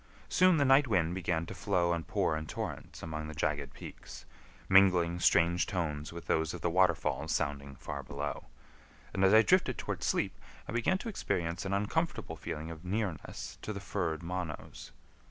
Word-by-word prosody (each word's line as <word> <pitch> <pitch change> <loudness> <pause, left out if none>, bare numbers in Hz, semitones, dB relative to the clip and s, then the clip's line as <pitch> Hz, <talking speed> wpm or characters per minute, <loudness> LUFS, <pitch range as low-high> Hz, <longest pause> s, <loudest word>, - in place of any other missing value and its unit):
Soon 185 -2 +5
the 140 - +3
night 135 +1 +6
wind 90 -6 +2
began 85 -2 -1
to - - -7
flow 90 -4 +1
and 80 -3 -3
pour 80 - +1
in 80 0 -4
torrents - - -6
among 80 -1 -4
the 80 - -7
jagged 75 0 -1
peaks, - - -10 0.4
mingling 90 -3 +5
strange 85 0 +3
tones 80 -5 -2
with 85 0 -8
those 80 -1 0
of - - -8
the 85 - 0
waterfalls 80 -4 +2
sounding 70 -2 -2
far 70 0 -5
below; 70 +1 -5 0.7
and 95 - 0
as 95 - +6
I 110 +1 +8
drifted 180 -7 +3
toward - - -4
sleep - - 0 0.3
I - - -5
began 120 +11 +2
to 220 - -7
experience 85 - -2
an 100 - -1
uncomfortable 105 +12 -1
feeling 80 +2 -5
of 80 0 -9
nearness 95 -2 -4
to - - -4
the 100 - -4
furred 85 -5 -2
Monos. 90 -2 -5
85 Hz, 175 wpm, -32 LUFS, 80-100 Hz, 0.7 s, I